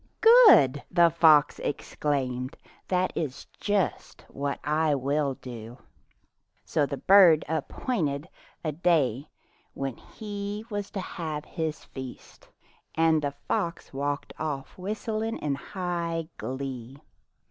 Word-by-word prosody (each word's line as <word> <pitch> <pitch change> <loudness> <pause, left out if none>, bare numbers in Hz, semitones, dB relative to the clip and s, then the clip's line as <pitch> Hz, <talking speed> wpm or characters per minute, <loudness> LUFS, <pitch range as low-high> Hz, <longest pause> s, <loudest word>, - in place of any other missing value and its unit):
"Good!" 140 - +6
the 170 -2 +5
fox 155 -3 +5
exclaimed, 130 -3 -2 0.3
"that 185 0 +1
is 140 -5 -4
just 205 -5 -1
what 140 0 -3
I 150 +1 +2
will 140 +1 0
do." 120 -2 -9 0.9
So 150 -3 +1
the 140 - -4
bird 180 -5 +6
appointed 160 - -2 0.4
a 155 - -1
day 150 -5 +1 0.5
when 135 -3 -4
he 205 0 -6
was 205 -1 -3
to 200 - -5
have 155 -5 -5
his 160 -3 -4
feast, 130 -2 -10 0.5
and 160 -1 +3
the 140 -1 -3
fox 170 -3 -2
walked 140 +1 -3
oflf 145 -4 -4
whistling 215 +3 -3
in 145 -2 -2
high 170 0 -3
glee. 130 -1 -5
155 Hz, 115 wpm, -27 LUFS, 140-175 Hz, 0.9 s, Good